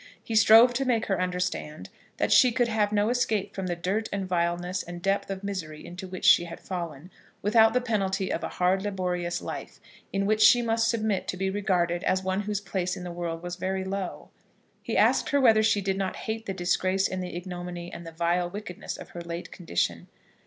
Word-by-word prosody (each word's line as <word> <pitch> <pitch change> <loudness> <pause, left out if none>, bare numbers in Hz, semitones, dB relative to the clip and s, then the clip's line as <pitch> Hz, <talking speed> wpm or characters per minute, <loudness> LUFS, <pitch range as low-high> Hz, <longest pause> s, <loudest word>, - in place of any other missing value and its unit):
He 225 - -5
strove 225 +3 +7
to 265 +3 0
make 245 -4 +1
her 195 -2 0
understand 180 -4 -3 0.3
that - - 0
she 250 - +7
could 245 0 +1
have 215 -2 +1
no 210 +1 +2
escape 220 -5 0
from 190 -1 -4
the 175 - -1
dirt 190 +6 -2
and 195 -1 -2
vileness 175 +1 -1
and 175 0 -8
depth 195 +2 0
of 195 0 -5
misery 165 -7 -5
into 180 +2 -8
which 185 0 -6
she 175 - +7
had 170 0 -8
fallen, 170 -2 -6 0.3
without 220 +2 +5
the 250 - +3
penalty 195 -5 -1
of - - -3
a - - -2
hard, 185 +1 +1
laborious 180 -3 -2
life, - - -7 0.3
in 195 0 0
which 215 +1 +1
she 245 +2 +7
must 225 0 +1
submit 220 -4 0
to 185 - -3
be 190 +1 -1
regarded 180 -4 0
as 185 0 +1
one 190 +1 0
whose 205 0 -2
place 185 -2 -2
in 180 - -7
the 175 - -5
world 170 -1 -4
was 175 0 -5
very 190 +1 -2
low. 190 -1 -5 0.5
He - - -2
asked - - +3
her 285 - +3
whether 225 -5 +5
she 210 -1 +2
did 195 0 -1
not 190 -1 -2
hate 220 0 -5
the 195 - -2
disgrace 185 +2 +1
and 185 0 -4
the 180 -1 -6
ignominy 175 -1 -6
and 170 - -7
the 165 - -8
vile 170 +2 0
wickedness 200 -1 -6
of - - -10
her 175 - -8
late 170 0 -6
condition. 85 - -2
190 Hz, 215 wpm, -27 LUFS, 175-210 Hz, 0.5 s, strove